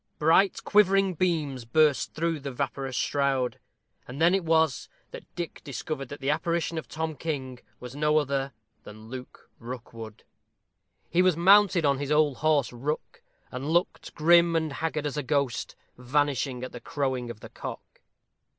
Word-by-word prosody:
Bright 165 +6 +3
quivering 195 -2 +4
beams 155 -7 -1
burst 145 +3 +2
through 165 -1 -1
the 140 0 -5
vaporous 135 0 -3
shroud, 135 -1 0 0.5
and 130 +3 -8
then 170 +2 +5
it 195 -1 +1
was 160 -4 +1 0.2
that - - -9
Dick 175 -2 -5
discovered 140 0 -5
that 145 - -8
the 135 +2 +1
apparition 170 +1 -1
of - - -10
Tom 160 0 -4
King 130 -5 -4 0.2
was 125 +1 -9
no 150 +1 +2
other 140 -2 0 0.3
than 110 +1 -12
Luke 130 0 -10
Rookwood. 115 -3 -9 0.9
He 175 - +4
was 185 -3 +3
mounted 190 -1 +5
on 140 -1 +2
his 145 0 -3
old 150 -3 +3
horse, 150 -5 +1
Rook, 145 +6 -4 0.3
and 130 +4 -5
looked 175 +2 -1
grim 170 +1 +5
and 160 -3 0
haggard 155 0 -2
as 145 0 -3
a - - 0
ghost 140 -2 -1 0.2
vanishing 135 -1 0
at 130 - -5
the 120 - -9
crowing 130 -2 -2
of 110 -2 -9
the - - -10
cock. - - -9
145 Hz, 160 wpm, -27 LUFS, 130-160 Hz, 0.9 s, then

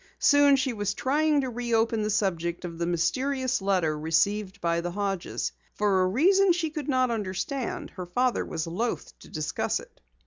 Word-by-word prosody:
Soon 285 -1 +5
she 260 -1 0
was 205 -2 -2
trying 295 +3 +2
to 260 - -3
reopen 230 -2 0
the 210 - -1
subject 180 -4 -1
of 170 -1 -7
the 170 - 0
mysterious 255 +9 0
letter 185 -6 +1
received 195 +6 0
by 170 -1 0
the 175 - -3
Hodges. 195 -1 -2 0.2
For 200 -3 +2
a 185 - +3
reason 365 - +4
she 330 -3 -2
could 300 -2 -5
not 255 -2 +2
understand, 225 +5 -3
her 180 -2 -7
father 250 +7 +1
was 160 -1 -4
loath 205 +9 -3
to - - -14
discuss 155 -1 -2
it. - - -16
210 Hz, 175 wpm, -27 LUFS, 180-260 Hz, 0.2 s, Soon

